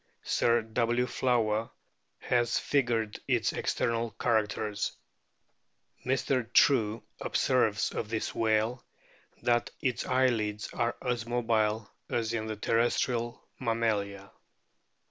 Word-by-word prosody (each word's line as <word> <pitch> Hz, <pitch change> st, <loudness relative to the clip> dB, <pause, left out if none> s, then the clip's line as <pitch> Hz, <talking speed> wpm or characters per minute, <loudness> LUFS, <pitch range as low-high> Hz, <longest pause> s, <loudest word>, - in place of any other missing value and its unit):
Sir 115 Hz, -1 st, +2 dB
W. 120 Hz, +2 st, +1 dB
Flower 115 Hz, -4 st, +1 dB, 0.5 s
has 120 Hz, -1 st, +1 dB
figured 120 Hz, -6 st, 0 dB
its -, -, +1 dB
external 115 Hz, 0 st, 0 dB
charac 110 Hz, -3 st, +2 dB
ters, 105 Hz, -1 st, -3 dB, 1.1 s
t -, -, -8 dB
Mr. 130 Hz, -2 st, 0 dB
True 115 Hz, -5 st, +4 dB
| -, -, -29 dB
observes 110 Hz, -6 st, +1 dB
of 105 Hz, -, -4 dB
this 110 Hz, -1 st, -2 dB
whale 110 Hz, +2 st, +1 dB, 0.6 s
that 120 Hz, -1 st, +2 dB
its 125 Hz, -2 st, -1 dB
eyelids 115 Hz, -5 st, +1 dB
are 120 Hz, 0 st, -1 dB
as 120 Hz, -2 st, -1 dB
mobile 110 Hz, -3 st, +1 dB, 0.2 s
as 115 Hz, -1 st, -1 dB
in 110 Hz, -1 st, -2 dB
the 110 Hz, -, -3 dB
terrestrial 120 Hz, +2 st, 0 dB, 0.2 s
mammalia. 105 Hz, -5 st, -1 dB
115 Hz, 110 wpm, -30 LUFS, 110-120 Hz, 1.1 s, True